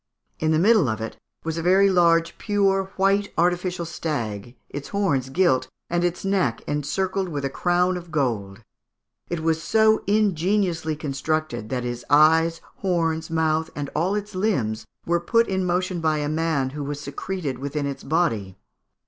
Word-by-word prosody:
In 155 - +1
the 155 - +3
middle 195 - +4
of 110 0 -2
it 110 - -5 0.3
was 160 0 -2
a - - -2
very 190 +3 +5
large 170 -2 +3
pure 195 -2 +2
white 195 +1 +2
artificial 180 0 +1
stag, 120 -9 -4
its 145 0 -7
horns 155 -11 0
gilt, 130 -5 +2 0.2
and 175 0 +1
its 175 +2 -1
neck 185 -12 0
encircled 185 +6 -1
with 145 -3 -3
a 135 - -2
crown 180 +2 +1
of 175 -1 -9
gold. 115 -9 -2 0.7
It 170 -2 -2
was 160 0 +1
so 220 +3 +3
ingeniously 190 -5 +1
constructed 155 -4 -2
that 125 -1 -2
its 120 0 -4
eyes, 160 +3 +5 0.2
horns, 165 -4 0
mouth, 160 0 +1
and 145 -1 -4
all 180 +6 +1
its 210 0 -4
limbs, 160 - -1 0.2
were 170 0 +2
put 230 +7 +2
in 190 -1 -1
motion 180 0 0
by 155 -1 +2
a 145 -1 -1
man 155 -4 0
who 145 +1 -5
was 145 +1 -4
secreted 145 -1 -4
within 140 +1 -3
its 140 -1 -5
body. 115 - 0
165 Hz, 165 wpm, -24 LUFS, 140-185 Hz, 0.7 s, very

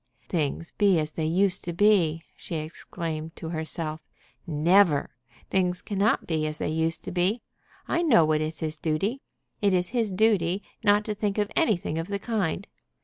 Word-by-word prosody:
"Things 165 0 -1
be 200 -4 +3
as 155 -1 -1
they 160 0 -3
used 185 +3 +2
to 175 - -3
be!" 170 -5 +3
she 170 - -7
exclaimed 160 0 -5
to 160 - -6
herself. 160 -1 -4 0.5
"Never! 165 0 +3 0.4
Things 180 -2 +1
cannot 205 +2 +1
be 155 -2 0
as 155 0 -4
they - - -2
used 160 +1 0
to - - -5
be. 185 +6 0 0.4
I 340 - +1
know 240 - +5
what 155 0 +1
is 155 0 -4
his 155 -1 -2
duty. 195 - -1 0.4
It 200 -2 +3
is 180 0 +1
his 230 -4 0
duty 190 -2 +2 0.2
not 205 0 +4
to 215 - -2
think 205 -1 -2
of 210 0 0
anything 180 - +1
of 165 - -4
the 200 0 -2
kind. 200 -4 -2
175 Hz, 175 wpm, -26 LUFS, 160-205 Hz, 0.5 s, know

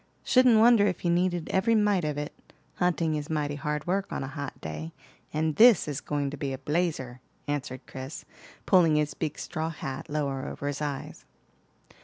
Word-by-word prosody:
"Shouldn't 255 -3 +5
wonder 225 -2 +6
if 185 -2 -3
you 170 - +3
needed 175 -1 +1
every 210 +4 +2
mite 205 -4 +3
of 150 -1 -2
it. 150 0 -4 0.4
Hunting 170 -3 +1
is 150 -1 -3
mighty 150 -2 -1
hard 150 +1 -3
work 195 +2 -1
on - - -3
a - - -4
hot 145 0 -6
day, 80 +1 -6 0.4
and 155 0 -1
this 235 -5 +7
is 145 -1 -3
going 145 -2 -2
to 150 - -6
be 140 -2 -3
a - - -4
blazer," 145 -4 -2 0.3
answered 135 -3 -4
Chris, 130 +3 -8 0.4
pulling 170 -5 +5
his 150 -1 +1
big 155 0 -4
straw 160 +1 -3
hat 135 -4 -6
lower 140 -3 -2
over - - -6
his 145 +1 -2
eyes. 145 -2 -5
150 Hz, 185 wpm, -28 LUFS, 140-180 Hz, 0.4 s, this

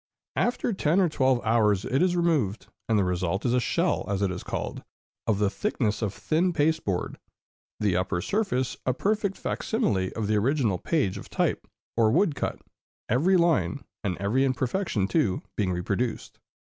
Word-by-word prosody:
After 240 -1 +1
ten 170 -1 +2
or 185 - +4
twelve 130 -5 +1
hours 105 -4 +3
it 135 - +1
is 180 -1 +3
removed, 145 - +1 0.2
and 110 - +3
the 100 - +3
result 90 +2 -1
is 120 - +2
a 125 - +4
shell, 170 +8 +1
as 100 0 0
it 95 - +1
is 90 - -5
called, - - -4 0.4
of 110 -3 +2
the 100 -1 +1
thickness 115 - -1
of 105 -3 0
thin 170 - 0
pasteboard, 150 - 0 0.6
the 100 -4 +1
upper 90 0 0
surface 160 - -1
a 130 - +2
perfect 205 +1 0
fac - - -3
simile 100 - 0
of 110 - -2
the 105 +1 +2
original 115 - +1
page 145 - 0
of - - -11
type - - -1 0.3
or 115 -2 +4
wood 165 - +3
cut, - - -3 0.5
every 165 - +4
line, 170 -4 +2 0.2
and 95 -4 -1
every 105 +8 +1
imperfection 130 - 0
too, 105 - +1
being 100 -4 0
reproduced. 100 +7 -2
120 Hz, 170 wpm, -27 LUFS, 100-165 Hz, 0.6 s, or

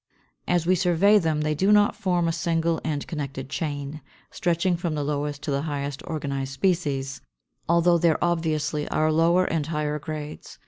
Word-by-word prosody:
As 175 -2 +1
we 180 - +4
survey 185 +3 +4
them, 160 -4 0
they 155 0 0
do 190 +7 +2
not 205 0 +5
form 175 -3 0
a - - +2
single 165 0 0
and 150 -3 -2
connected 140 -4 -5
chain, 145 -1 -4 0.3
stretching 175 +1 +1
from 170 -2 -2
the 150 - -1
lowest 145 0 -3
to 145 - -2
the 140 0 0
highest 140 -2 -4
organized 140 -4 -3
species, 135 -6 -1 0.5
although 170 0 +4
there 165 -1 +3
obviously 155 -3 -1
are 155 0 +2
lower 170 +3 +3
and 155 -4 -1
higher 150 -1 -2
grades. 150 0 -7
155 Hz, 170 wpm, -25 LUFS, 145-170 Hz, 0.5 s, not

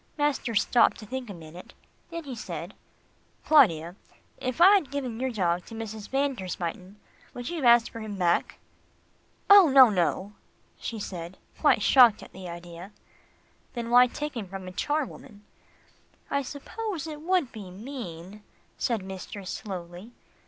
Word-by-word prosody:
Master 290 -6 0
stopped 235 +3 +3
to 215 - -10
think 255 +1 -6
a - - -6
minute, 165 +2 -12 0.4
then 335 -1 -6
he 275 -3 -7
said, 230 - -7 0.7
"Claudia, 175 - +4 0.4
if 255 +1 -4
I 375 +4 +8
had 375 -10 +2
given 260 -5 -4
your 260 +1 -1
dog 180 -6 0
to 225 - -9
Mrs. 220 -1 -7
van 275 +1 +1
der 190 -7 -7
Spyten, 180 +2 -5 0.4
would 245 +1 -5
you 345 - -4
have 285 - -2
asked 235 -1 +5
for 230 - -8
him 215 -2 -6
back?" 175 -2 +1 0.9
"Oh, 400 -5 +8
no, 265 -4 +8
no," 185 +2 -1 0.5
she 230 - -5
said 180 -3 -7 0.2
quite - - +3
shocked 245 -5 +6
at - - -13
the 185 -1 -8
idea. 175 +3 -10 0.8
"Then 235 -1 -5
why 250 +1 +7
take 295 +3 -5
him 220 -5 -5
from 190 0 -8
a - - -6
charwoman?" 265 -3 -4 0.9
"I 280 - +1
suppose 325 - -5
it 305 -2 -7
would 350 -5 +1
be 205 -4 -9
mean," 200 -3 -8 0.4
said 230 -6 -1
mistress 190 0 -7
slowly. 185 +2 -7
225 Hz, 160 wpm, -27 LUFS, 185-270 Hz, 0.9 s, I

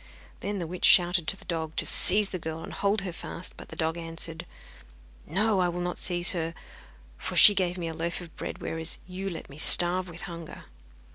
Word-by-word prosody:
Then 205 0 -4
the 175 - -4
witch 180 +2 -2
shouted 175 -2 +4
to 195 - -1
the - - -14
dog 160 -2 -4
to - - +3
seize 200 +2 +2
the 185 - -4
girl 160 0 -6
and - - -9
hold 200 +1 0
her 185 -3 -6
fast; 170 - -7
but - - -13
the - - -9
dog 160 +1 -2
answered: 165 -1 -4 0.8
'No, 200 +5 +1
I 180 -1 +2
will 175 +1 -5
not 175 0 -3
seize 175 -1 +3
her, 165 -1 -3 0.6
for - - -5
she 205 - +9
gave 185 -2 -1
me 170 -2 -4
a 165 - -5
loaf 170 +1 -4
of 170 -2 -12
bread, - - -7
whereas 160 0 -1
you 185 +2 -6
let 165 -3 -8
me 140 +2 -13
starve 180 +2 +6
with 170 0 -8
hunger. 170 -2 -9
175 Hz, 215 wpm, -27 LUFS, 165-185 Hz, 0.8 s, she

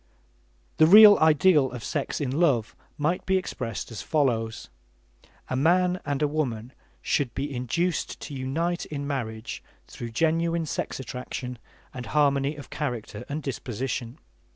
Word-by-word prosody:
The 155 - +6
real 210 +3 +10
ideal 155 -2 +4
of 120 -2 -7
sex 145 -3 -2
in 140 -4 -2
love 135 -8 +1 0.2
might 155 +5 0
be 190 0 +3
expressed 125 - -4
as 105 -4 -6
follows: 115 -7 0 0.8
A 130 - -2
man 180 +6 +3
and 145 0 -1
a - - +3
woman 130 -5 -3 0.3
should 140 -5 0
be 140 0 -3
induced 165 +9 -1
to 150 - -7
unite 160 +7 -2
in 145 -2 -5
marriage 115 -6 -4 0.2
through 120 - -7
genuine 165 +5 +1
sex 150 - -4
attraction 125 -1 -6 0.3
and 125 -2 -7
harmony 140 0 +2
of 145 -3 -11
character 110 -3 -4
and 150 +2 -4
disposition. 125 -1 -4
140 Hz, 140 wpm, -26 LUFS, 125-160 Hz, 0.8 s, real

